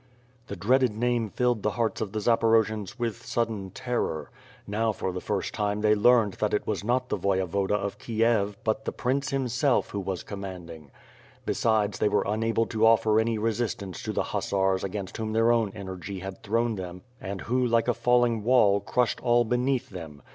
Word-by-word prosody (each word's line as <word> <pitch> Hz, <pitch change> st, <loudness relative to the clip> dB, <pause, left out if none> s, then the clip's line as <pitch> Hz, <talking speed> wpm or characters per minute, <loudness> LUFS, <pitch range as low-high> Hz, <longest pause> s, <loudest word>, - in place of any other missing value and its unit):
The -, -, -5 dB
dreaded 125 Hz, +5 st, +2 dB
name 120 Hz, -2 st, 0 dB
filled 120 Hz, 0 st, 0 dB
the 105 Hz, -, +1 dB
hearts 115 Hz, -2 st, 0 dB
of 105 Hz, -3 st, -3 dB
the 110 Hz, -, -4 dB
Zaporojians 110 Hz, -2 st, +2 dB
with 115 Hz, -4 st, -3 dB
sudden 110 Hz, -5 st, -2 dB
terror. 120 Hz, -7 st, -3 dB, 0.3 s
Now 110 Hz, +2 st, 0 dB
for 95 Hz, -2 st, -3 dB
the 90 Hz, 0 st, -5 dB
first 100 Hz, -2 st, -2 dB
time 105 Hz, 0 st, -1 dB
they 105 Hz, 0 st, +4 dB
learned 110 Hz, -1 st, +4 dB
that 105 Hz, -1 st, +1 dB
it -, -, -2 dB
was 105 Hz, -2 st, -2 dB
not 125 Hz, +3 st, 0 dB
the -, -, -1 dB
Voyevoda 95 Hz, +1 st, 0 dB
of 100 Hz, -1 st, -3 dB
Kiev, 110 Hz, -3 st, +1 dB
but 125 Hz, +5 st, -1 dB
the -, -, -1 dB
prince, 130 Hz, +2 st, -1 dB
himself, 135 Hz, 0 st, +1 dB
who 100 Hz, -, -3 dB
was 95 Hz, -2 st, -4 dB
commanding. 90 Hz, -6 st, -8 dB, 0.6 s
Besides 105 Hz, -3 st, +1 dB
they 105 Hz, -, +3 dB
were 105 Hz, -, +1 dB
unable 115 Hz, +2 st, 0 dB
to 110 Hz, -1 st, -2 dB
offer 110 Hz, -1 st, +4 dB
any 115 Hz, 0 st, +1 dB
re 115 Hz, +2 st, +1 dB
sistance 110 Hz, -4 st, -4 dB
to -, -, -3 dB
the -, -, 0 dB
hussars 95 Hz, -1 st, 0 dB
against 95 Hz, -1 st, -5 dB
whom 110 Hz, -1 st, -3 dB
their 115 Hz, +1 st, +4 dB
own 115 Hz, -4 st, +2 dB
energy 95 Hz, -1 st, -6 dB
had 95 Hz, 0 st, -7 dB
thrown 115 Hz, +1 st, 0 dB
them 90 Hz, -1 st, -7 dB, 0.2 s
and 95 Hz, 0 st, -5 dB
who, 125 Hz, +2 st, 0 dB
like 115 Hz, -1 st, +2 dB
a 120 Hz, -, +3 dB
falling 120 Hz, -2 st, +2 dB
wall, 110 Hz, -4 st, +4 dB
crushed 120 Hz, +3 st, 0 dB
all 120 Hz, -1 st, +3 dB
beneath 125 Hz, +2 st, 0 dB
them. 80 Hz, -6 st, -9 dB
110 Hz, 190 wpm, -27 LUFS, 100-120 Hz, 0.6 s, they